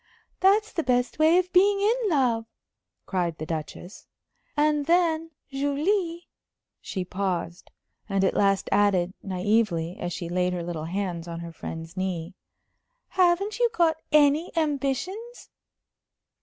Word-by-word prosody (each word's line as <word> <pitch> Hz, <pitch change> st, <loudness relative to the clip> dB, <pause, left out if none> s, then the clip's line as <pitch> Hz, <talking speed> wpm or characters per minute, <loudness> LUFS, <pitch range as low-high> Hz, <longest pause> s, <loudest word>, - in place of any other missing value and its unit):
"That's 415 Hz, +3 st, +3 dB
the 335 Hz, -, 0 dB
best 250 Hz, 0 st, 0 dB
way 320 Hz, +3 st, +5 dB
of 365 Hz, 0 st, 0 dB
being 395 Hz, +2 st, +5 dB
in 445 Hz, +2 st, +1 dB
love," 245 Hz, -7 st, +1 dB, 0.6 s
cried 175 Hz, -4 st, -1 dB
the 155 Hz, -, -5 dB
Duchess. 160 Hz, +4 st, -6 dB, 0.5 s
"And 295 Hz, -1 st, +2 dB
then, 330 Hz, -2 st, +2 dB, 0.2 s
Julie" 330 Hz, +6 st, -1 dB, 0.5 s
she 185 Hz, -2 st, -4 dB
paused, 180 Hz, -2 st, -3 dB, 0.4 s
and 195 Hz, -1 st, +1 dB
at 190 Hz, -, +2 dB
last 195 Hz, -1 st, +2 dB
added, 195 Hz, -3 st, +2 dB
naïvely, 185 Hz, -3 st, 0 dB
as 175 Hz, -, -3 dB
she 170 Hz, 0 st, -5 dB
laid 180 Hz, +1 st, 0 dB
her 175 Hz, -1 st, -3 dB
little 165 Hz, -2 st, -4 dB
hands 175 Hz, -1 st, -3 dB
on 170 Hz, 0 st, -6 dB
her 170 Hz, 0 st, -7 dB
friend's 165 Hz, +1 st, -8 dB
knee 185 Hz, -2 st, -3 dB, 0.8 s
"haven't 370 Hz, +4 st, +2 dB
you 480 Hz, -1 st, +4 dB
got 330 Hz, -6 st, +2 dB
any 300 Hz, +2 st, +4 dB
ambitions?" 320 Hz, -, -2 dB
245 Hz, 130 wpm, -26 LUFS, -, 0.8 s, way